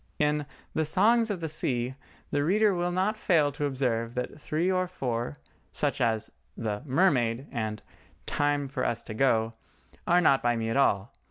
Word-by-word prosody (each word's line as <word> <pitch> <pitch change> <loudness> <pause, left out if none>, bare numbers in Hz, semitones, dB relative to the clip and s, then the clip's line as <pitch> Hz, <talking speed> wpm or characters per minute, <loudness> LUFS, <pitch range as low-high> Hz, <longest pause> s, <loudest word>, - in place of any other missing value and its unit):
In 150 -1 +1 0.3
the 160 - +1
"Songs 225 +8 +3
of 195 -4 -3
the 160 - -2
Sea" 125 -5 0 0.4
the 145 - +1
reader 205 +5 +3
will 175 0 -1
not 190 +4 +1
fail 155 -8 +3
to 145 - -3
observe 125 -4 -1
that 125 +4 -4
three 165 +6 0
or 185 0 +1
four, 120 - -3 0.3
such - - 0
as 110 -2 0 0.3
the 105 -2 -3
"Mermaid" 130 -5 +2
and 110 -2 -3 0.4
"Time 145 -1 0
for 135 - -3
Us 115 -1 -1
to 110 - -7
Go," 115 -2 +2 0.5
are 175 +1 +5
not 140 -6 +4
by 120 0 +2
me 115 -1 -2
at 115 - 0
all. 105 -6 +2
140 Hz, 175 wpm, -28 LUFS, 115-170 Hz, 0.5 s, are